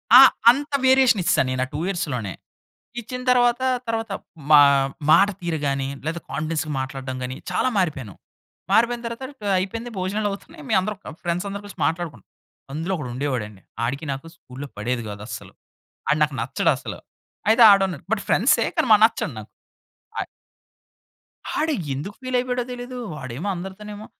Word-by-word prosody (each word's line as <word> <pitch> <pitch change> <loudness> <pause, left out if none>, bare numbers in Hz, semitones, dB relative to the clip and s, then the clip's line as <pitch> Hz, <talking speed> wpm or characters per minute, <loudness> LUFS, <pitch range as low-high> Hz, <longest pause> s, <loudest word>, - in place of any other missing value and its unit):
ఆ! - - +13 0.3
అంత 285 +3 -4
వేరియేషనిచ్చేశా 260 -8 +4
నేను 130 0 -1
ఆ - - -12
2 150 - -3
ఇయర్స్‌లోనే. 125 - -2 0.7
ఇచ్చిన 250 +2 -6
తర్వాతా, 245 +1 +3 0.2
తర్వాత 225 -2 -2 0.4
మా 150 -1 +10 0.5
మాట 200 - +7
తీరుగానీ, 145 -5 -1 0.2
లేదా 165 +2 -2
కాన్ఫిడెన్స్‌‌గా 155 +1 -2
మాట్లాడడం 130 -1 -5
గానీ 125 +1 -4 0.2
చాలా - - +1
మారిపోయాను. 140 - -1 0.6
మారిపోయిన 235 +1 +3
తర్వాత 235 +3 -6 0.2
క - - -11 0.2
అయిపోయింది, 230 +6 -4
భోజనాలవుతున్నాయి. 205 - -3
మే 220 - +1
అందరం 210 +1 -3
క - - -8
ఫ్రెండ్సందరూ 195 +4 -2
కలిసి 200 -3 -11
మాట్లాడుకున్ 160 - -4 0.5
అందులో 165 +5 -2
ఒకడుండేవాడండి. 125 - -4 0.2
ఆడికి 140 +6 -3
నాకు 135 +4 -6
స్కూల్‌లో 140 -2 -9
పడేది 120 +3 -2
గాదు 105 0 -7
అస్సలు. - - -8 0.6
ఆడు 150 - +3
నాకు 145 -3 -4
నచ్చడసలు. - - -1 0.5
అయితే, 230 +2 +6
ఆడున్నాడు 190 -6 +1
బట్, 225 - +1
ఫ్రెండ్సే, 230 0 +4
కానీ - - +2
మ - - +10
నచ్చడు 225 - +1
నాకు. - - -13 0.7
అయ్ - - -3 1.3
ఆడు 310 0 +1 0.2
ఎందుకు 185 +10 -5
ఫీలయిపోయాడో 250 -1 0
తెలీదు. 245 +1 -7 0.2
వాడేమో 135 +4 -6
అందరితోనేమో, 205 +4 -8
185 Hz, 140 wpm, -23 LUFS, 140-230 Hz, 1.3 s, ఆ